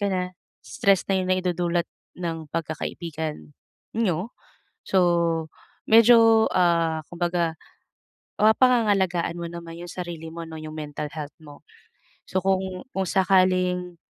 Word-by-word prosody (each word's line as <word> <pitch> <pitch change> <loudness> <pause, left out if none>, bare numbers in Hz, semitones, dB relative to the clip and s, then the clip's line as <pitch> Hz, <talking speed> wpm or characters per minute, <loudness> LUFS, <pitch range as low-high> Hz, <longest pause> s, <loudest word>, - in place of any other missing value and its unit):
ka 200 - +1
na, 180 0 -2 0.3
stress 195 -2 +2
na 190 - +2
yung 185 - -3
naidudulot 175 -2 0 0.3
ng 165 -2 -4
pagkakaibigan 155 - -5 0.4
niyo, 205 0 -1 0.5
so 190 - +1 0.9
medyo, 225 0 +6
ah, 170 -3 +2
kumbaga, 175 -1 -1 0.9
ah, 215 +1 +6
mapapangangalagaan 205 -9 +2
mo 170 - -4
naman 170 -1 -8
yung 175 0 -8
sarili 170 -3 -6
mo 170 0 -6
'no, 160 - -8
yung 155 0 -8
mental 150 -1 -5
health 150 -2 -6
mo. 145 -2 -13 0.7
So, 185 - 0
kung 190 -1 -1
kung 195 - 0
sakaling, 185 -2 +2
175 Hz, 125 wpm, -24 LUFS, 165-190 Hz, 0.9 s, medyo